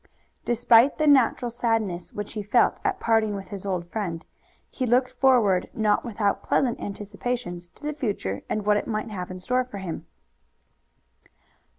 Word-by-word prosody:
Despite 240 +2 +4
the 310 - +1
natural 255 -4 +4
sadness 225 -7 -1
which 205 0 -6
he 215 - -3
felt 225 +4 +2
at - - 0
parting 220 -2 +2
with 195 -1 -7
his 200 -1 -6
old 180 -3 -2
friend, 175 -7 -3 0.5
he 255 - -2
looked 250 +2 +3
forward 225 -9 +3
not 210 -2 +2
without 210 -4 -1
pleasant 250 -4 0
anticipations 200 -2 -4
to - - -23
the 300 0 -2
future 205 - -3
and 215 -1 -2
what 210 0 +4
it - - -3
might 215 0 -3
have 180 -3 -5
in 185 0 -7
store 250 +7 +1
for 245 -5 -9
him. 185 -4 -6
215 Hz, 165 wpm, -25 LUFS, 195-245 Hz, 0.5 s, Despite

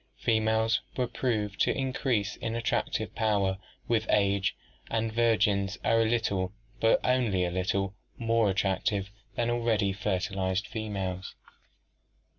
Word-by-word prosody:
Females 110 0 +2 0.2
were 125 - +2
proved 105 -6 -2
to - - +2
increase 130 -5 0
in 115 - -3
attractive 115 -1 -1
power 100 -4 +1 0.3
with 110 -2 +1
age, 100 -2 +2 0.3
and 115 -1 -1
virgins 105 -4 +2
are 115 - +4
a - - +3
little, 100 -5 0 0.3
but 115 - +4
only 115 -8 +2
a 90 - -2
little, 95 +2 -1 0.2
more 115 -2 +2
attractive 95 +1 0 0.2
than 120 0 +1
already 115 -5 +1
fertilized 95 0 -1
females. 95 -4 -4
105 Hz, 120 wpm, -29 LUFS, 95-115 Hz, 0.3 s, are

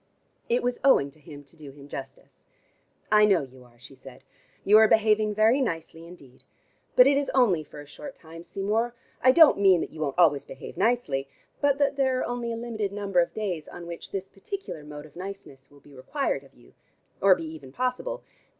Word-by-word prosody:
It 240 +1 +1
was 245 0 -1
owing 140 - +4
to 155 - -22
him 145 -1 -12
to 140 +4 -17
do 155 -3 -11
him 140 0 -14
justice. 135 -2 -10 0.7
"I 210 0 +6
know 195 -7 +4
you 130 -1 -14
are," 120 -1 -23
she 130 +3 -14
said, 135 0 -14 0.4
"you 210 +2 +7
are 220 - +7
behaving 215 -1 +2
very 225 +6 +4
nicely 165 -6 -4
indeed. 140 -8 -15 0.5
But 250 - +8
it 280 +1 +4
is 285 - -3
only 200 -12 +3
for 150 0 -12
a - - -12
short 270 - -10
time, 165 0 -12
Seymour. 220 +6 -2 0.3
I 255 - +6
don't 320 -3 +6
mean 190 -3 +5
that - - -5
you 155 - -9
won't 140 -1 -2
always 150 -6 +4
behave 135 - -10
nicely, 145 - 0 0.3
but 285 -1 +2
that 285 -1 +1
there 265 -2 +1
are - - -1
only 240 -1 -3
a - - -3
limited 225 -4 -4
number 200 -2 -1
of 170 - 0
days 185 -8 -3
on 175 - -10
which 170 0 -8
this 195 -1 -5
particular 195 - -8
mode 150 0 -10
of 150 - -18
niceness 180 -8 -9
will 145 -1 -20
be 145 - -18
required 275 - -3
of - - -21
you, - - -21 0.5
or 195 -1 +6
be 165 - -7
even 155 -4 -10
possible. 255 - -3
190 Hz, 210 wpm, -26 LUFS, 145-235 Hz, 0.7 s, But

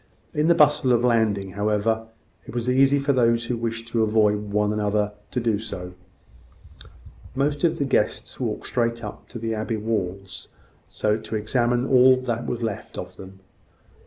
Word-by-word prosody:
In 150 +1 +1
the 170 - +5
bustle 150 -5 +4
of 120 0 +2
landing, 110 -5 +1
however, 105 +3 0 0.4
it - - -9
was 120 +1 0
easy 135 +2 +4
for 140 0 +1
those 115 -2 +2
who 120 - -2
wished 115 0 -4
to 115 -1 0
avoid 105 -1 +2
one 105 0 +1
another 105 0 0 0.2
to 125 - -2
do 115 -3 0
so. 90 -5 -7 1.4
Most 145 +3 0
of 165 -2 +2
the 140 - 0
guests 135 - -1
walked - - -3
straight 115 -1 -1
up 105 - -8
to 125 - -8
the 115 0 -3
abbey 110 +1 -2
walls, 95 -3 -4 0.5
to 110 +1 -1
examine 120 +3 +1
all 130 -1 +6
that 120 -2 -3
was 120 -1 -3
left 110 -3 -5
of - - -7
them. 95 0 -12
115 Hz, 165 wpm, -24 LUFS, 105-125 Hz, 1.4 s, all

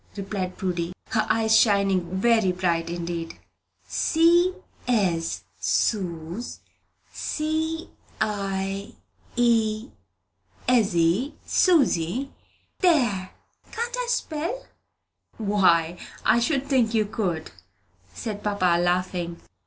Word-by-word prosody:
replied 195 -2 -4
Prudy, 175 -2 -2 0.2
her 215 -2 +1
eyes 220 -1 +3
shining 200 -4 +4 0.2
very 225 -3 +3
bright 170 -2 0
indeed. 170 -1 -4 0.5
"C 340 +2 +4 0.4
ez, 185 -9 0 0.2
Sooz, 180 +1 -1 0.5
C 320 +1 -2 0.3
i 195 0 -2 1.7
ezzy, 205 - +2
Susy. 270 - +2 0.5
There! 240 - +2 0.4
Can't 475 +2 -3
I - - -2
spell?" 355 +2 -2 0.7
"Why, 180 -5 +2 0.3
I 235 - +5
should 275 +2 0
think 240 -5 +2
you 215 -1 +3
could," 185 -7 -3 0.6
said 210 -3 -5
papa, 185 -4 +2
laughing. 175 -1 -1
205 Hz, 85 wpm, -25 LUFS, 180-250 Hz, 1.7 s, I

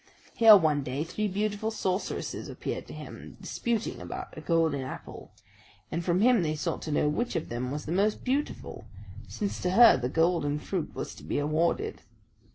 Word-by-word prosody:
Here 225 -2 +9
one 155 -5 +2
day 135 +2 -3
three 210 +6 -2
beautiful 205 +2 -1
sorceresses 190 -3 -3
appeared - - -5
to - - -9
him, - - -10
disputing 235 - -2
about 90 - -7
a 155 - -7
golden 160 -3 +1
apple; 130 - -8 0.6
and 170 +2 -2
from 175 +2 +1
him 240 -2 +5
they 155 -2 0
sought 150 - -3
to 155 - -5
know 150 - +2
which 235 +9 -1
of 165 - -2
them 120 +2 -3
was 145 +3 -4
the 155 - -4
most 200 +4 +1
beautiful, 275 +3 -3 0.4
since 205 -2 -4
to 180 - 0
her 230 - +7
the 125 0 -2
golden 160 -1 +1
fruit 170 +2 -4
was - - -5
to - - -13
be - - -2
awarded. 165 - 0
170 Hz, 180 wpm, -28 LUFS, 150-210 Hz, 0.6 s, Here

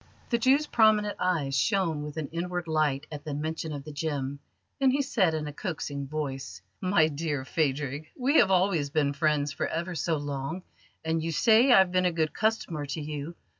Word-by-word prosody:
The 235 - +2
Jew's 270 +5 +4
prominent 215 -5 +3
eyes 160 -7 0
shone 170 -2 +1
with 150 +1 -7
an 155 -3 -3
inward 175 +1 -3
light 150 -3 +1
at 150 -2 -7
the 150 -2 -4
mention 160 +1 -3
of 145 -2 -5
the 150 - -8
gem, 145 -2 -3 0.4
and 270 -1 +4
he 280 +2 +1
said 195 - +1
in 155 -1 -3
a 150 - -6
coaxing 145 -5 -4
voice: 135 -9 -4 0.2
"My 185 -4 +3
dear 145 -3 -3
Phadrig, 145 0 -1
we 275 +4 +3
have 205 - +5
always 180 -6 +2
been 145 -1 +1
friends 150 -1 +1
for - - -2
ever 170 +2 -3
so 160 0 0
long, 145 +4 -4 0.4
and 160 0 0
you 165 +1 -2
say 230 - +5
I've 190 -6 +6
been 185 0 +2
a 180 - +3
good 160 -2 -1
customer 190 -9 -1
to 140 +3 -4
you. 150 +2 -5
160 Hz, 195 wpm, -28 LUFS, 145-185 Hz, 0.4 s, I've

